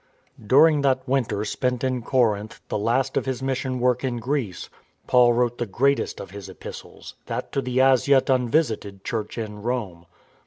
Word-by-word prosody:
During 145 +7 +5
that 130 -1 +1
winter 115 -6 0
spent 125 +3 -2
in 130 -1 0
Corinth, 110 -4 0
the - - -1
last 120 +5 0
of - - -1
his 130 0 -3
mission 130 -1 -2
work 125 +1 +1
in 125 -2 -1
Greece, 120 -5 -3 0.4
Paul 120 -1 +5
wrote 120 0 0
the 120 - -2
greatest 140 +8 0
of 95 - -8
his 100 -1 -9
Epistles, - - -10
that - - -4
to 135 - -1
the 125 0 -1
as 130 -1 +4
yet 140 -2 +4
unvisited 120 -7 0
Church 110 -1 -4
in 105 -2 -5
Rome. 105 -8 -4
125 Hz, 170 wpm, -24 LUFS, 110-130 Hz, 0.4 s, During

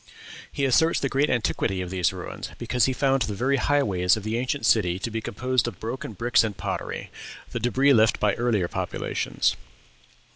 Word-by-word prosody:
He 140 - -1
asserts 160 +5 +3
the 140 - -1
great 140 +3 +1
antiquity 110 -4 0
of 90 -1 -4
these 90 -3 +1
ruins, 90 -1 -7
because 125 - +1
he 130 - +1
found 135 +1 +1
the 105 -2 -1
very 135 +6 +1
highways 100 -11 +2
of 110 - -7
the 110 +1 -2
ancient 130 +4 -2
city 90 -5 +3
to 115 +5 -4
be 110 +1 -3
composed 125 +4 -1
of - - -6
broken 115 0 -5
bricks 115 +5 +2
and 105 -3 -3
pottery, - - -4 0.4
the - - -3
débris 135 +3 +3
left 110 -1 +3
by 105 -2 +2
earlier 115 -7 0
populations. - - -1
115 Hz, 185 wpm, -25 LUFS, 100-130 Hz, 0.4 s, asserts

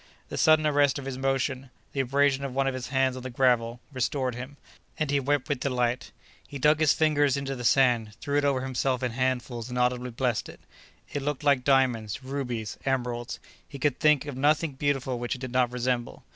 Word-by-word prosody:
The - - -5
sudden 155 -1 +5
arrest 145 -2 +3
of 140 - -6
his 135 -1 -5
motion, 135 0 -1 0.2
the 140 - -3
abrasion 135 +1 +2
of 135 -2 -4
one 135 0 +2
of 135 - 0
his 130 -1 -5
hands 130 0 +1
on 130 - -6
the 130 - -6
gravel, 120 -2 +1
restored 130 0 -1
him, 130 +4 -8 0.4
and 155 -2 -1
he 145 - +3
wept 140 0 0
with 145 -3 -1
delight. 125 -1 -1 0.4
He 140 - -7
dug 150 +3 +3
his 155 -2 +4
fingers 145 -3 +2
into 135 -1 -3
the 125 - -7
sand, 120 -4 +3
threw 145 - -3
it 145 - +3
over 140 -2 +1
himself 130 0 -1
in 125 - 0
handfuls 125 -1 -2
and 125 - -4
audibly 125 0 +1
blessed 120 -1 -1
it. - - -13 0.5
It 145 - -2
looked 145 +1 -3
like 140 -3 +3
diamonds, 130 -4 +1
rubies, 125 -6 -4
emeralds; 125 -3 -2 0.3
he 140 - -8
could 135 -1 0
think 150 -2 +4
of 145 -3 -6
nothing 150 +4 +2
beautiful 135 -2 -1
which 120 0 -2
it 130 - -11
did 130 -2 -5
not 125 -1 +2
resemble. 125 -1 -2
130 Hz, 210 wpm, -27 LUFS, 125-140 Hz, 0.5 s, sudden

